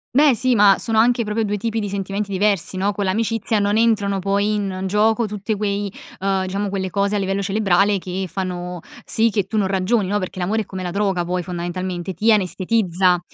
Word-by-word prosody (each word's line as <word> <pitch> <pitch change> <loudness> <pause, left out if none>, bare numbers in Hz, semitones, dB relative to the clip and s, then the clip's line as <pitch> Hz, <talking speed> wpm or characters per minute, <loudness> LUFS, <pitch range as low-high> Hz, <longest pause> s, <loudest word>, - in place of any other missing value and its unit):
Beh, 290 -2 +5
sì, 255 +2 +1
ma 205 -3 +6
sono 225 -1 0
anche 240 +1 +3
proprio 220 +1 -1
2 210 0 -1
tipi 225 +2 -2
di 205 -2 -3
sentimenti 195 +1 -3
diversi, 195 -2 +1
no? 200 +2 +1
Con 200 - -2
l'amicizia 225 +2 0
non 205 +1 +1
entrano 205 -4 +2
poi 200 +2 0
in 195 -2 -2
gioco 220 +4 +2
tutte 210 +1 -3
quei 200 -1 -2 0.3
ehm, 195 0 0
diciamo, 200 +2 -2
quelle 190 -1 -3
cose 200 +2 0
a - - +2
livello 195 0 -1
cerebrale 200 0 +2
che 185 0 -4
fanno 180 -2 -4 0.2
sì 225 0 +2
che 200 -3 0
tu 220 - -2
non 205 - +2
ragioni, 195 +2 +1
no, 205 - +1
perché 185 -1 -6
l'amore 200 +5 0
è 210 - -6
come 185 -1 -6
la 175 - -3
droga 195 -3 0
poi 180 +1 -1
fondamentalmente, 180 +1 -4
ti 215 +7 +2
anestetizza, 185 -2 +2
200 Hz, 205 wpm, -21 LUFS, 185-210 Hz, 0.3 s, ma